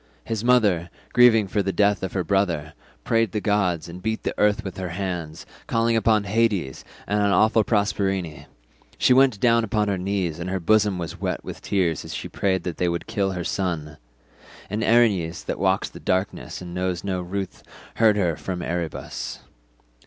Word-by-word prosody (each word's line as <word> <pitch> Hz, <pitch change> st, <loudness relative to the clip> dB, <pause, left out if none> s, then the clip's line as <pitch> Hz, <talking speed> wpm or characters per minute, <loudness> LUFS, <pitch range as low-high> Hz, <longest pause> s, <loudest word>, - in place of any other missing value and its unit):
His 110 Hz, -1 st, -3 dB
mother, 105 Hz, -9 st, +3 dB, 0.2 s
grieving 115 Hz, -4 st, +6 dB
for 100 Hz, +2 st, 0 dB
the 95 Hz, 0 st, -1 dB
death 100 Hz, 0 st, +2 dB
of 95 Hz, -, -4 dB
her 95 Hz, -, 0 dB
brother, 85 Hz, -5 st, 0 dB, 0.3 s
prayed 115 Hz, -3 st, +1 dB
the 105 Hz, -, 0 dB
gods, 100 Hz, -6 st, 0 dB
and 85 Hz, +2 st, -9 dB
beat 110 Hz, +1 st, -2 dB
the -, -, -1 dB
earth 105 Hz, +1 st, +3 dB
with 95 Hz, -, -7 dB
her 95 Hz, -1 st, -4 dB
hands, 85 Hz, -3 st, -4 dB, 0.2 s
calling 115 Hz, 0 st, +1 dB
upon 110 Hz, -2 st, +3 dB
Hades 100 Hz, -, 0 dB, 0.2 s
and 105 Hz, 0 st, 0 dB
on 100 Hz, -, +3 dB
awful 110 Hz, +3 st, +4 dB
Proserpine; 100 Hz, -6 st, -1 dB, 0.5 s
she -, -, +4 dB
went 130 Hz, -5 st, +4 dB
down 115 Hz, 0 st, +4 dB
upon 105 Hz, -1 st, 0 dB
her 95 Hz, -2 st, -1 dB
knees 90 Hz, -4 st, -2 dB
and 85 Hz, +1 st, -4 dB
her 95 Hz, 0 st, -1 dB
bosom 105 Hz, +1 st, +3 dB
was 85 Hz, -3 st, -6 dB
wet -, -, -2 dB
with -, -, -8 dB
tears 90 Hz, -6 st, 0 dB
as -, -, -7 dB
she -, -, -5 dB
prayed 95 Hz, -2 st, -1 dB
that 90 Hz, -3 st, -4 dB
they 90 Hz, -, +1 dB
would 85 Hz, 0 st, -3 dB
kill 95 Hz, -2 st, -1 dB
her 90 Hz, -1 st, -3 dB
son—and 75 Hz, -, -6 dB
Erinys 105 Hz, -8 st, +2 dB
that -, -, -3 dB
walks -, -, 0 dB
in -, -, -9 dB
darkness 95 Hz, 0 st, -2 dB
and 85 Hz, -1 st, -8 dB
knows 90 Hz, -1 st, -2 dB
no 95 Hz, -2 st, -2 dB
ruth 95 Hz, +2 st, -5 dB, 0.4 s
heard 110 Hz, -2 st, +4 dB
her 90 Hz, -5 st, +1 dB
from 90 Hz, 0 st, -5 dB
Erebus. 85 Hz, -1 st, -4 dB
95 Hz, 180 wpm, -24 LUFS, 90-105 Hz, 0.5 s, grieving